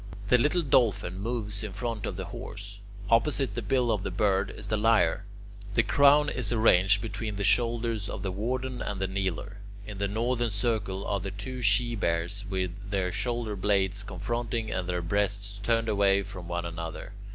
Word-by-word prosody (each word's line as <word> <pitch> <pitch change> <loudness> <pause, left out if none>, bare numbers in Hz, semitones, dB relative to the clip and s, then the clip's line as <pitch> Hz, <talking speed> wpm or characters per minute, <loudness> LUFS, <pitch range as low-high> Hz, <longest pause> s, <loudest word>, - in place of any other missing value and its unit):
The 125 - +6
little 150 +7 +2
Dolphin 110 - +2
moves 105 -1 -2
in 105 -3 -5
front 115 0 -3
of 95 - -4
the 95 +1 -5
Horse. 105 -3 -8 0.3
Opposite 135 +4 +2
the 120 - -3
bill 120 +2 +1
of 105 -3 0
the 95 - -3
Bird 95 +1 +1
is - - -8
the 110 - 0
Lyre. 105 -4 +2 0.5
The 115 - +5
Crown 145 +3 +5
is 125 -6 0
arranged 105 -3 +4
between 110 -1 -4
the 100 - -3
shoulders 115 -1 +2
of - - -5
the 95 - -2
Warden 125 +5 -3
and 100 - -3
the 95 - 0
Kneeler. 95 0 -3 0.3
In 105 -2 -8
the 100 - 0
northern 120 +3 0
circle 100 -2 -1
are 100 - -1
the 100 +1 -4
two 125 +6 -6
She 120 +2 +4
Bears 85 +1 -1
with 95 -2 -1 0.2
their 95 -2 0
shoulder 120 -1 -2
blades 100 0 +1
confronting 110 +3 -3
and 90 -1 -2
their 90 -1 -1
breasts 100 +2 0
turned 115 +1 +1
away 100 -2 +3
from 95 -3 -9
one 85 0 -3
another. 85 -1 -6
105 Hz, 185 wpm, -28 LUFS, 95-115 Hz, 0.5 s, The